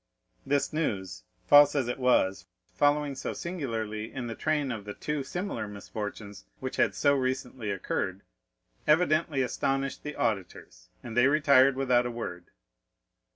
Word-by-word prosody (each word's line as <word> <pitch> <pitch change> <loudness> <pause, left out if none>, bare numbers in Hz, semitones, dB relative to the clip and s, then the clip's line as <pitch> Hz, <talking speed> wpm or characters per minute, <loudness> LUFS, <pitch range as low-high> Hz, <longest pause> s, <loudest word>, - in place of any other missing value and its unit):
This 140 +1 +1
news, 95 - -3 0.2
false 145 0 +7
as 135 -4 +1
it 125 - -3
was 125 -7 +2 0.3
following 145 0 +2
so 130 - -4
singularly 115 - -4
in 125 - -5
the 115 - -4
train 150 +1 -1
of 110 -4 -5
the 105 0 -7
two 150 -2 -3
similar 140 - -4
misfortunes 105 - -7 0.2
which - - -5
had - - +2
so 145 - +3
recently 130 -4 -2
occurred, 95 -1 -3 0.6
evidently 155 -3 +3
astonished 135 +2 -1
the 150 0 -6
auditors, 100 -5 -3
and 115 -2 -7
they 120 +2 +5
retired 140 -2 +5
without 125 -2 +2
a - - -3
word. 90 -7 -6
130 Hz, 145 wpm, -28 LUFS, 110-145 Hz, 0.6 s, false